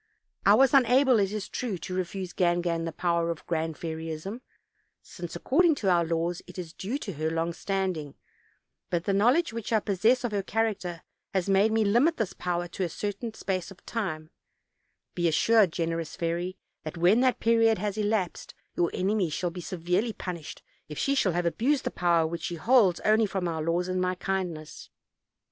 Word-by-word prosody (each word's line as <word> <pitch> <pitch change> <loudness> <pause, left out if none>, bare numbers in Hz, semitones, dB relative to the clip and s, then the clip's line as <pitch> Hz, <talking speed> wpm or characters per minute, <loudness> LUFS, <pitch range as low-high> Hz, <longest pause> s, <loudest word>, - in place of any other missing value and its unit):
I - - +8
was 270 -1 +4
unable, 255 -1 +5
it 195 -1 +1
is 210 -2 -4
true, 230 -7 -3
to 185 - -7
refuse 185 0 -3
Gangan 175 -2 +1
the 165 - -3
power 170 0 0
of 165 -2 -5
Grand 160 -1 -2
Fairyism, 160 +7 -5 0.6
since, 175 -2 -8
ac - - -15
cording 330 +3 +4
to 195 -8 +1
our 170 -1 +4
laws, 165 +1 -1
it - - -12
is 170 -3 -6
due 215 +10 -3
to 205 -9 -6
her 155 +1 -1
long 165 +1 -1
standing; 180 -5 -2 0.7
but 170 -1 -1
the 200 - 0
knowledge 245 - +3
which 230 -1 -5
I 220 - +4
possess 220 +6 +2
of 240 - -1
her 205 -1 0
character 195 -5 -2 0.3
has 190 -1 +1
made 200 +3 +4
me 220 -1 +2
limit 245 +11 +3
this 220 -5 -2
power 175 -1 -2
to 185 - -3
a 175 - -1
certain 210 +5 -4
space 185 -2 -3
of 195 - -15
time; 160 -8 -4 0.8
be 175 -1 +1
as 160 - +2
sured, 220 -1 +5
generous 165 -1 -3
fairy, 175 +1 -2 0.2
that 155 +2 -7
when 180 +7 +4
that 255 0 +2
period 225 -1 +4
has 205 +1 -2
elapsed 210 -4 -2 0.2
your 170 -1 +2
enemy 190 -1 +1
shall 175 +3 -2
be 180 - -7
severely 180 +5 -1
punished 170 -7 -7 0.3
if 150 - -7
she 275 - +1
shall 200 -10 +2
have 175 +1 0
abused 255 - +1
the - - -2
power 170 -2 +2
which 165 +1 -4
she 175 - -3
holds 200 -1 +4
only 215 +1 +3
from 190 -2 -2
our 160 -2 -2
laws 170 +3 0
and 185 0 -1
my 185 0 0
kindness. 180 -5 -4
185 Hz, 195 wpm, -27 LUFS, 170-220 Hz, 0.8 s, I